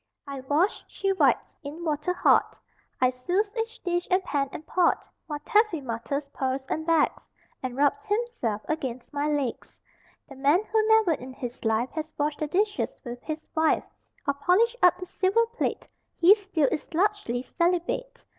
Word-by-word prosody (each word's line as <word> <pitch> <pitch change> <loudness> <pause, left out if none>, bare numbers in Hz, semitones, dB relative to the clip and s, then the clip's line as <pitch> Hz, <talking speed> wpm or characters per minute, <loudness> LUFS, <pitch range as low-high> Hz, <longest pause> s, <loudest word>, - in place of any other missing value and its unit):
I 280 -1 -6
wash, 295 +9 +1
She 390 0 -1
wipes. 380 - +1
In 300 +4 -7
water 300 +2 0
hot 360 - +3 0.4
I 255 0 +4
souse 360 +12 -1
each 455 0 -3
dish 350 -1 -1
and 370 +1 +3
pan 280 -5 -1
and 305 - -8
pot; 355 +1 +2 0.2
While 300 -2 -3
Taffy 425 -6 +3
mutters, 275 +3 -3
purrs, 265 -1 -2
and 315 +1 -2
begs, 330 -2 +2 0.3
And 255 -1 -4
rubs 290 +10 +2
himself 415 - -1
against 260 -6 -4
my 290 +1 0
legs. 285 -5 -2 0.5
The 275 - -11
man 285 +8 +3
who 435 0 +1
never 440 -5 +5
in 260 -4 -4
his 245 -1 -7
life 225 +2 +1
Has 315 -1 -5
washed 295 0 -1
the 305 - -1
dishes 410 +6 0
with 245 0 -6
his 310 +1 -5
wife 320 -1 +2 0.4
Or 280 - +3
polished 370 +12 +2
up 360 - +6
the 365 - -6
silver 390 +6 +2
plate 465 +1 -3 0.3
He 355 +4 +8
still 390 -8 0
is 305 - -4
largely 365 - +1
celibate. 360 - -1
315 Hz, 170 wpm, -27 LUFS, 275-390 Hz, 0.5 s, He